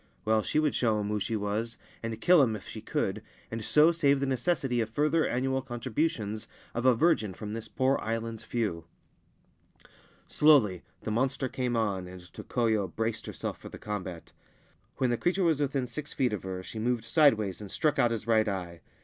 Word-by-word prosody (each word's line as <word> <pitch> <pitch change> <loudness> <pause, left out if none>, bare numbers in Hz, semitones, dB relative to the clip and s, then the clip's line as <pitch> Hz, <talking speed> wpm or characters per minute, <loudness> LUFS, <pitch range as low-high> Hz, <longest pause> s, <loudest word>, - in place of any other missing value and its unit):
Well, 110 0 +3
she - - -2
would 155 -2 +3
show 110 -3 +2
him 105 0 -2
who 105 0 0
she 110 +3 -2
was, 110 +3 -2 0.2
and 115 -1 -4
kill 175 +6 +6
him 115 -5 +2
if 105 - -9
she - - -7
could, - - -2 0.3
and 115 -1 -4
so 150 +8 +5
save 140 -5 +3
the 140 - 0
necessity 135 -2 0
of 110 - -2
further 150 +6 +2
annual 130 +2 0
con 120 -2 -7
tributions 110 -5 -2 0.3
of 120 +2 0
a 125 - +6
virgin 115 - +2
from 105 0 -6
this 115 0 -5
poor 130 +1 +1
island's 115 0 -3
few. 100 -9 -2 1.4
Slowly 125 - +4 0.2
the 110 - -3
monster 130 +4 0
came 125 -1 -2
on, 100 -5 -1
and 90 0 -9
Tokoyo 110 -5 0
braced 110 +5 -3
herself - - -5
for - - -9
the - - -9
combat. 95 -5 -6 0.7
When 130 -2 +1
the 120 - +1
creature 185 +6 +1
was 160 -4 +3
within 135 -2 0
six 145 +5 -6
feet 125 -4 +1
of 105 - -3
her, 95 -1 -5
she 110 - -7
moved 120 0 0
sideways 115 - +3
and 100 - -7
struck 155 +6 0
out 120 - +5
his 115 -2 -3
right 110 -1 +3
eye. 90 -4 -4
115 Hz, 195 wpm, -29 LUFS, 105-135 Hz, 1.4 s, kill